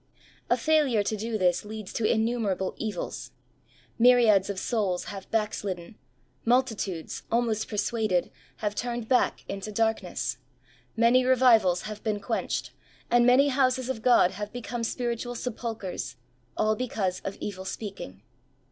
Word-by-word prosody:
A - - +4
failure 295 -9 +3
to 215 - -1
do 220 +1 -2
this 180 -3 +2
leads 215 -1 -7
to 220 - +1
innumerable 220 -5 0
evils. 210 -5 -4 0.7
Myriads 230 -5 +5
of 200 - -3
souls 195 -4 -1
have 195 -1 -9
back 215 -2 0
slidden; 185 0 -5 0.5
multitudes, 225 -9 0
almost 225 -2 +1
persuaded, 215 -3 0 0.3
have 205 - 0
turned 240 0 -3
back 255 0 +2
into 195 +2 -5
darkness; 200 - -1 0.6
many 235 +3 +5
revivals 235 -8 +4
have 215 -1 -7
been 215 -2 -1
quenched; 200 - -2 0.4
and 240 0 +5
many 270 +3 +6
houses 260 -1 +1
of 260 -4 -3
God 240 -6 +5
have 210 +2 -6
become 240 -1 -5
spiritual 240 +1 -2
sepulchres, 220 - -4 0.4
all 215 0 +2
because 210 -7 -2
of 195 - -6
evil 190 -2 -5
speaking. 190 - -7
220 Hz, 135 wpm, -27 LUFS, 195-240 Hz, 0.7 s, many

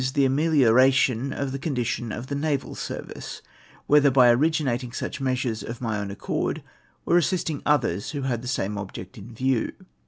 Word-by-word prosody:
the 140 -1 +4
amelioration 135 -3 +3
of 140 0 -3
tlie 135 0 -5
condition 120 -5 -2
of 120 +4 -5
the 140 - -5
naval 140 -1 -1
service; - - -7 0.4
whether 145 -1 +5
by 125 -2 +6
originating 130 -3 +1
such 140 - -5
measures 130 -4 -1
of 115 0 -6
my 110 -4 -2
own 100 -1 -4
accord, 100 - -3 0.4
or 175 - +4
assisting 165 -4 -1
others 120 - +1
who 145 -3 -4
had 120 -4 -1
tlie 125 - -7
same 105 -3 -2
object 95 -2 -8
in 105 +4 -11
view. 130 +1 0
130 Hz, 165 wpm, -25 LUFS, 115-140 Hz, 0.4 s, by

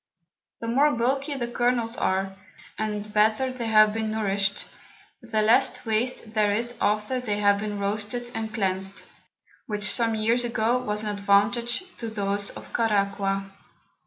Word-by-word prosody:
The 230 - -4
more 280 +5 +3
bulky 270 +5 0
the 240 -3 -2
Kernels 240 -1 0
are, 195 -2 -1 0.4
and 210 -1 -4
better 220 +5 +2
they 240 -3 -4
have 215 -1 +5
been 220 0 -2
nourished, 200 -2 0 0.6
the 225 -3 0
less 240 +5 +3
Waste 225 0 -1
there 210 -2 +2
is 235 +2 -1
after 210 +5 +1
they 215 -5 -2
have 205 -1 +3
been 210 0 -3
roasted 210 +4 -3
and 220 -1 -4
cleansed, 195 -2 -2 0.6
which 210 -1 -3
some 225 +1 +2
Years 230 +3 +1
ago 235 +1 +1
was 210 -3 -2
an 210 - -2
Advantage 205 - +1 0.2
to 230 - -4
those 200 -1 -2
of - - -11
Caraqua. 195 -3 0
215 Hz, 150 wpm, -26 LUFS, 205-235 Hz, 0.6 s, have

